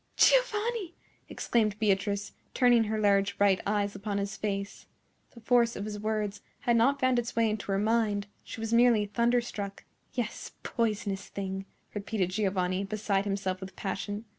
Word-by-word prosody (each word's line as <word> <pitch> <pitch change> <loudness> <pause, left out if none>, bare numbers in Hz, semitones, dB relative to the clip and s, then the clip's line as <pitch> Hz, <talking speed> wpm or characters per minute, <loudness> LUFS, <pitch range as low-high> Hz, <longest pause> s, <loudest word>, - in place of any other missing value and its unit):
"Giovanni!" 460 -6 +3 0.3
exclaimed 215 -3 0
Beatrice, 200 -1 0 0.2
turning 240 -3 +5
her 215 +1 -1
large 200 -1 +2
bright 200 -2 +4
eyes 205 -1 0
upon 200 0 -3
his 200 0 -2
face. 200 -1 -4 0.5
The - - -11
force 235 0 +3
of 200 - -4
his 210 -1 -5
words 215 -1 -2 0.2
had 240 -4 +2
not 270 +5 +3
found 255 -2 +3
its 235 -1 -4
way 230 -1 +3
into 215 -2 -3
her 195 - +2
mind; 210 -1 +1 0.2
she - - -8
was 225 0 -2
merely 235 -3 +5
thunderstruck. 235 -2 -1 0.3
"Yes, 240 -3 -4
poisonous 210 -4 -1
thing!" 195 -1 -4 0.3
repeated 205 -3 -2
Giovanni, 190 -2 0
beside 200 -1 -1
himself 195 -2 -2
with 190 0 -8
passion. 205 +2 -4
210 Hz, 155 wpm, -29 LUFS, 200-230 Hz, 0.5 s, turning